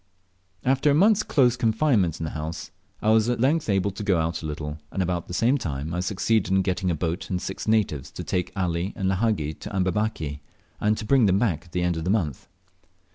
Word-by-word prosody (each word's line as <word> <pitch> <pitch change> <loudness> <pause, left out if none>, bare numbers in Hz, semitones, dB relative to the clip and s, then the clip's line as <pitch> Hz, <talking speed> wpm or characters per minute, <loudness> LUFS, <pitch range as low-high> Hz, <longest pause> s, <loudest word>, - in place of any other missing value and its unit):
After 135 +3 +3
a 140 - +4
month's 205 +5 +5
close 125 - +3
confinement 110 - +2
in - - -4
the 80 - -3
house 80 +1 -5 0.3
I 110 - +4
was 110 +1 +4
at 120 - 0
length 145 +3 +2
able 100 0 +1
to 95 - -8
go 100 -4 +2
out 80 0 -1
a 80 - -4
little, 75 0 -5
and 95 - 0
about 90 -1 -2
the - - -7
same 125 +7 +3
time 75 - -4
I 90 - -1
succeeded 100 +2 0
in 95 0 +3
getting 95 0 -1
a 85 - +1
boat 85 +2 -3
and 90 - -1
six 95 +4 -6
natives 100 -11 +1
to - - -6
take 90 -1 -2
Ali 90 0 -1
and 95 - -1
Lahagi 95 -6 0
to - - -7
Amberbaki, 95 -6 -1 0.4
and 105 +1 +1
to - - -5
bring 125 -1 +4
them 95 0 +3
back 95 -7 0
at 85 - -19
the 90 +1 -1
end 90 -1 0
of 80 +1 -4
a - - +1
month. 90 - -1
95 Hz, 230 wpm, -25 LUFS, 85-110 Hz, 0.4 s, month's